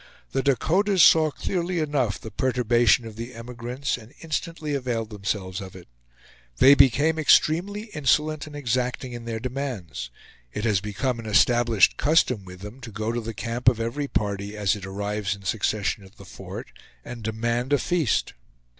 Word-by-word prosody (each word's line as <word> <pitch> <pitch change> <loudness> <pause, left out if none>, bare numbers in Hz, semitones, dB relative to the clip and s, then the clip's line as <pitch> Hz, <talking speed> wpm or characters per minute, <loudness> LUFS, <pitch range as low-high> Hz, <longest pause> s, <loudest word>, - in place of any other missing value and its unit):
The - - 0
Dakotas 175 - +3
saw 155 -1 +6
clearly 180 +3 -2
enough 145 - 0
the 110 - -9
perturbation 120 -1 +2
of 110 -1 -9
the 120 +2 -7
emigrants 120 +3 -4
and 115 +1 -15
instantly 160 -1 -3
availed 120 -5 -2
themselves 100 -2 -3
of 95 -1 -9
it. 90 -2 -12 0.7
They 135 +2 +8
became 140 +4 +4
extremely 175 +7 +3
insolent 150 +1 +1
and 150 - -10
exacting 125 -1 -2
in 120 -1 -7
their 115 -1 -3
demands. 120 - -5 0.4
It 105 - -4
has 105 -4 +2
become 115 +4 -2
an 115 - -7
established 115 0 +4
custom 130 - +2
with 90 0 -11
them 105 +6 -9
to 115 - -8
go 110 +2 -2
to 120 0 -2
the 115 0 -6
camp 120 +3 +2
of 120 -2 -2
every 125 +6 -2
party, 100 -2 -2
as 100 -1 +1
it 95 -2 -8
arrives 100 +1 -2
in 100 - -15
succession 105 0 -1
at 95 +3 -16
the 100 - -13
fort, - - -9 0.3
and 120 -1 -8
demand 115 +4 -2
a 145 - +5
feast. 165 - 0
120 Hz, 170 wpm, -25 LUFS, 105-140 Hz, 0.7 s, They